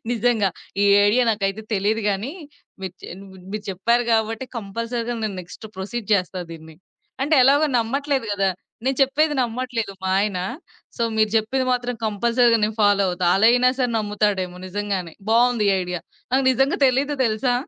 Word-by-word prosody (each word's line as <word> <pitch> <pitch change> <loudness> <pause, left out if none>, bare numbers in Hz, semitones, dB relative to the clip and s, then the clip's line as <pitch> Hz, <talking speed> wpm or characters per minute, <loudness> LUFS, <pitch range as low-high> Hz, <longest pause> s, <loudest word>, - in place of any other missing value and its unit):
నిజంగా. 230 -3 +2 0.3
ఈ - - +4 0.2
ఐడియా 245 +5 +3
నాకయితే 205 0 -2
తెలీదు 210 +3 0
గానీ, 210 +9 -3 0.5
మీరు 190 -2 -5
చే - - -8
నువ్వున్ 190 -2 -14
మీరు 210 0 -5
చెప్పారు 235 +6 +1
గాబట్టి, 225 +2 0
కంపల్సరీగా 230 +3 -4
నేను 205 -3 -3
నెక్స్ట్ 180 +5 -11
ప్రొసీడ్ 205 +3 -5
చేస్తా 185 -1 -1
దీన్ని. 160 -1 -11 0.5
అంటే, 305 +3 +2
ఎలాగో 285 +3 +5
నమ్మట్లేదు 270 +2 -1
గదా! 195 -1 +1 0.3
నేను 265 -1 0
చెప్పేది 295 +3 +2
నమ్మట్లేదు 240 -3 -3
మా 190 - 0
ఆయన. 205 -3 -1 0.6
సో, - - -2
మీరు 215 -1 +2
జెప్పేది 240 +4 +1
మాత్రం 245 0 -1
కంపల్సరీగా 235 +2 +2
నేను 215 0 -3
ఫాలో 205 -1 +4
అవుతా. 180 0 -1
అలా 215 +3 +4
అయినా 250 +1 +4
సరే 250 -2 +1
నమ్ముతాడేమో. 205 -4 -1
నిజంగానే 190 -3 -3 0.2
బావుంది 235 -1 +3
ఈ - - +3
ఐడియా. 180 -1 -4 0.3
నాకు 265 +1 +2
నిజంగా 270 +5 +1
తెలీదు 270 +3 +1
తెలుసా? 230 +3 +1
220 Hz, 160 wpm, -22 LUFS, 195-245 Hz, 0.6 s, ఎలాగో